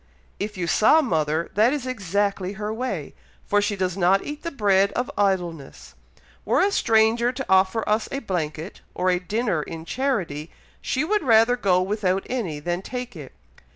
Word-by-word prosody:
"If 210 0 -4
you 180 - -2
saw 220 - +4
mother, 160 - -1
that 220 +6 +3
is 285 -4 -3
exactly 200 -4 -1
her 210 +1 -4
way, 250 +3 -4 0.3
for 205 -1 +2
she 205 0 -1
does 185 -2 -1
not 195 +1 +3
eat 295 0 -6
the 335 - -3
bread 200 -8 +2
of 245 0 -2
idleness. 175 -8 -2 0.5
Were - - +2
a 395 +2 +3
stranger 225 - +3
to 265 +1 -5
offer 190 +3 +2
us 215 +1 0
a 275 - -2
blanket 170 - -4
or 185 0 +1
a 180 - +1
dinner 205 -2 -1
in 160 +1 -7
charity, 180 - -2 0.3
she 265 - -1
would 420 +6 +1
rather 230 -3 +4
go 185 -6 +2
without 195 -1 -1
any 195 -13 -2
than 175 +4 -2
take 250 +1 -6
it. 145 -5 -10
205 Hz, 175 wpm, -24 LUFS, 180-240 Hz, 0.5 s, saw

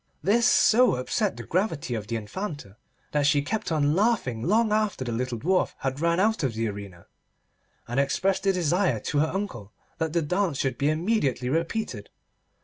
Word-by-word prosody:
This 235 +5 +3
so 245 - +5
upset 190 - -1
the - - -6
gravity 165 - -1
of 105 -3 -4
the 115 - -3
Infanta 115 - -6 0.4
that 145 -1 +2
she 145 -1 +3
kept 210 +4 -3
on 150 -2 +2
laughing 195 - +1
long 215 - +2
after 210 -10 0
the 120 - -3
little 120 +1 -2
Dwarf 180 +10 0
had 135 0 -3
ran 170 +2 +1
out 220 +1 +2
of 130 -6 -1
the 115 0 -1
arena, 100 -4 -9 0.8
and 120 +3 -1
expressed 190 +8 0
a - - +6
desire 180 - +1
to 145 - -1
her 155 - +3
uncle 160 - -5 0.3
that 160 -1 -1
the 170 -1 +1
dance 180 -1 0
should 135 -3 -2
be 140 - +2
immediately 155 - 0
repeated. 165 - -2
155 Hz, 180 wpm, -26 LUFS, 125-195 Hz, 0.8 s, a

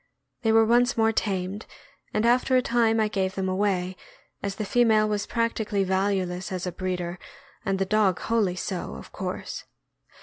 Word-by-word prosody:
They 225 - +2
were 225 0 +6
once 245 +3 +3
more 225 0 +4
tamed, 195 -1 -2 0.4
and 215 +1 0
after 255 +2 +3
a - - +4
time 230 -2 +2
I 215 - +3
gave 190 -3 -1
them 190 -1 -1
away, 185 -1 0 0.5
as 200 -1 -3
the 215 - -3
female 220 -1 +4
was 210 -1 -1
practically 220 -3 0
valueless 190 0 -1
as 185 -1 -3
a 180 - -2
breeder, 180 -1 -3 0.4
and 195 - 0
the 195 - 0
dog 200 -3 +2
wholly 215 -6 +1
so, 180 - -4
of 65 - -11
course. - - -5
200 Hz, 170 wpm, -26 LUFS, 185-225 Hz, 0.5 s, were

